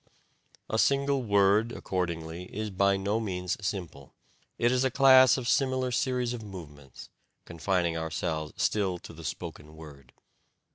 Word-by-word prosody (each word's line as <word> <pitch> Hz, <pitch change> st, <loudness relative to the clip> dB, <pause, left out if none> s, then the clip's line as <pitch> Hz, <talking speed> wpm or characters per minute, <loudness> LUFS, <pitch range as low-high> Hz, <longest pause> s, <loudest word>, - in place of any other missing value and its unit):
A 110 Hz, -, -1 dB
single 140 Hz, +1 st, +2 dB
word, 100 Hz, +1 st, +3 dB
accordingly, 85 Hz, -3 st, -4 dB
is 105 Hz, +2 st, -5 dB
by 100 Hz, +1 st, +2 dB
no 100 Hz, +3 st, -1 dB
means 90 Hz, -5 st, -3 dB
simple 90 Hz, -9 st, -5 dB, 0.4 s
it 120 Hz, +1 st, +2 dB
is 130 Hz, 0 st, +2 dB
a 130 Hz, -, +2 dB
class 130 Hz, 0 st, +6 dB
of 125 Hz, -2 st, -4 dB
similar 130 Hz, 0 st, +1 dB
series 125 Hz, -1 st, 0 dB
of 120 Hz, -, -6 dB
movements 75 Hz, -, -11 dB, 0.4 s
(confining 85 Hz, 0 st, -1 dB
ourselves 80 Hz, -1 st, -3 dB
still 95 Hz, -4 st, 0 dB
to -, -, -12 dB
the 80 Hz, +1 st, -11 dB
spoken 80 Hz, -1 st, -7 dB
word). 70 Hz, -5 st, -13 dB
95 Hz, 140 wpm, -28 LUFS, 80-120 Hz, 0.4 s, class